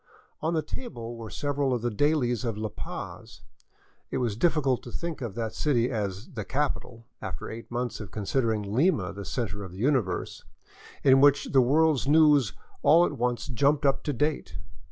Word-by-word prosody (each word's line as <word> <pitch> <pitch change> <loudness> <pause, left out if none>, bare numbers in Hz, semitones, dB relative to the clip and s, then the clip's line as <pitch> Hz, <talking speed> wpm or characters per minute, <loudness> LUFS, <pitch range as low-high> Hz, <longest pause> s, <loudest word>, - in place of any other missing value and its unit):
On 160 +2 0
the 155 - +1
table 120 - -6
were 115 -1 -8
several 145 -2 0
of 120 - -4
the 120 - 0
dailies 125 -2 +1
of 115 -4 -2
La 110 0 -2
Paz - - -8 0.3
— - - -36
it - - -2
was 120 -5 0
difficult 140 -2 +2
to 120 - -10
think 170 0 -5
of 115 -5 -4
that 115 -2 -3
city 125 -5 +1
as 100 -2 -3
" - - -18
the 110 - -4
capital 125 -3 -3
" - - -49
after - - -6
eight 115 +1 -8
months 120 0 -3
of 105 -4 -7
considering 110 0 0
Lima 125 - +2
the 100 0 -7
center 105 -5 -3
of 95 -2 -9
the - - -10
universe 120 -6 0 0.3
— - - -20
in 135 0 +6
which 145 0 +4
the 135 - +6
world's 145 +2 +3
news 150 -6 +5 0.3
all 170 +3 +6
at - - -1
once 120 -3 -1
jumped 140 +4 +1
up 135 - +3
to 150 - 0
date. 145 - -1
125 Hz, 195 wpm, -27 LUFS, 110-145 Hz, 0.3 s, in